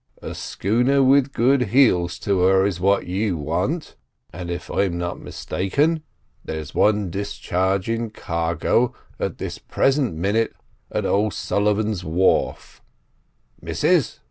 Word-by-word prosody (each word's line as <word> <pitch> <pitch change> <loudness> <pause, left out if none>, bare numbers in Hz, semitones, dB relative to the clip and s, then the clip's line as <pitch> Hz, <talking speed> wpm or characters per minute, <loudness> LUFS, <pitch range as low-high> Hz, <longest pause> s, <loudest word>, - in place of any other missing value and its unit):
"A - - -5
schooner 125 +7 +1
with 135 +1 +4
good 125 0 +2
heels 90 -9 +3
to 100 -2 +1
her 95 +1 +4
is 95 -3 -1
what 100 +2 +2
you 95 0 -1
want; 90 - -2 0.4
and, 85 0 -6
if 85 0 -4
I'm 95 -3 0
not 85 0 -3
mistaken, 145 - -1 0.4
there's 80 -2 -6
one 105 -4 +2
discharging 100 +3 -1
cargo 85 +5 0 0.2
at - - -2
this - - -5
present 135 - +1
minit 100 +7 0 0.4
at - - -1
O'Sullivan's 105 0 0
wharf. 90 +3 0 0.8
Missus!" - - +1
100 Hz, 115 wpm, -22 LUFS, 90-115 Hz, 0.8 s, with